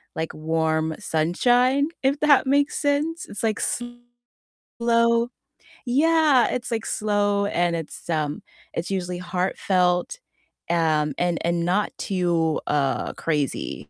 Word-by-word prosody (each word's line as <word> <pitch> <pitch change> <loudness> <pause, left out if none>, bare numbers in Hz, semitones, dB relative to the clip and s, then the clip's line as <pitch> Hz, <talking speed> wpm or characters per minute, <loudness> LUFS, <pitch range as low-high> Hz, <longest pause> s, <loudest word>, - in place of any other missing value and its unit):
like 160 0 -3
warm 160 0 -1
sunshine, 245 - +2 0.2
if 275 +2 +2
that 290 -3 +5
makes 285 +2 +2
sense. 300 +3 0
It's, 205 - -7
like, 220 -2 0 1.0
slow 235 0 +1 0.6
yeah, 295 0 +4
it's, 250 -1 -3
like, 225 -1 -2
slow 205 -1 0
and 175 -3 0
it's, 165 +1 -7
um, 150 -2 -1 0.3
it's 170 - -3
usually 180 -2 -2
heartfelt, 180 - 0 0.5
um, 155 -3 +1
and 175 -1 +1
and 170 0 0
not 190 +4 +1
too, 170 -4 0
uh, 140 -2 0
crazy. 140 - -3
185 Hz, 115 wpm, -23 LUFS, 165-245 Hz, 1.0 s, that